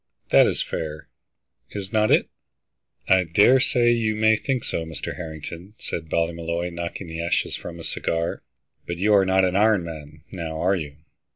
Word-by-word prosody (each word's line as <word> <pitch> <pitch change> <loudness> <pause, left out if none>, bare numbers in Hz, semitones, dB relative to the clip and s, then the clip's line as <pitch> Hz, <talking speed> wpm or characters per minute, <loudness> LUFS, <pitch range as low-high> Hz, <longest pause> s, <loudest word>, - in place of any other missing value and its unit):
That - - +7
is - - 0
fair, 75 -1 -5 0.6
is 100 +1 -7
not 110 0 +3
it?" - - +4 0.8
"I 95 -1 +5
dare 105 +10 +5
say 120 -2 +3
you 110 -2 +1
may 110 +1 +4
think 130 +1 -2
so, 80 - -2
Mr. 80 -1 -6
Harrington," 85 +4 -8
said 80 -2 -5
Ballymolloy, 85 +1 -1
knocking 85 +3 -5
the 80 0 -5
ashes 85 - 0
from 85 -1 -8
his 80 - -6
cigar. 85 0 -2 0.5
"But 85 - -3
you 105 +4 +3
are 100 -2 +5
not 95 0 +4
an 90 0 0
iron 105 -2 +4
man, 75 -3 -9
now, 80 -4 -5
are 95 +4 +2
you?" 75 -5 -5
85 Hz, 175 wpm, -24 LUFS, 80-105 Hz, 0.8 s, That